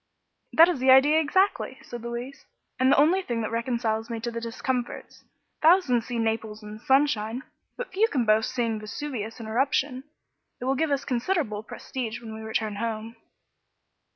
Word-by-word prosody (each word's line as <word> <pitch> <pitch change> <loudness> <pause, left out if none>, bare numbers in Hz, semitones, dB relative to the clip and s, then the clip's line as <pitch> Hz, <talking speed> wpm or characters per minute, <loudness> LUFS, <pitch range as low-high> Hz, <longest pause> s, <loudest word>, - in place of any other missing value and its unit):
"That 330 +1 +8
is 350 -7 -1
the 260 +1 +2
idea, 280 +4 +7
exactly," 375 +6 +1
said 240 -1 -8
Louise, 240 +3 -6 0.3
"and 260 +1 +4
the - - +5
only 330 +7 +4
thing 240 -10 -3
that 220 - -3
reconciles 230 -1 -1
me 230 -1 -3
to 235 +1 -3
the 230 0 -5
discomforts. 240 +2 -4 0.4
Thousands 310 -8 +4
see 245 -2 -3
Naples 220 -1 -2
in 210 +1 -9
sunshine, 260 -3 +1 0.3
but 485 -6 -6
few 420 +4 +3
can 260 - 0
boast 215 +1 +3
seeing 230 -3 -1
Vesuvius 225 0 -5
in 225 - -7
eruption. 265 +3 0 0.5
It 250 - -5
will 265 - +2
give 315 +3 0
us 280 -1 0
considerable 250 - -1
prestige 225 +1 -6
when 225 -2 -9
we 220 - -8
return 220 -1 -2
home." 225 +1 -4
240 Hz, 170 wpm, -26 LUFS, 225-280 Hz, 0.5 s, That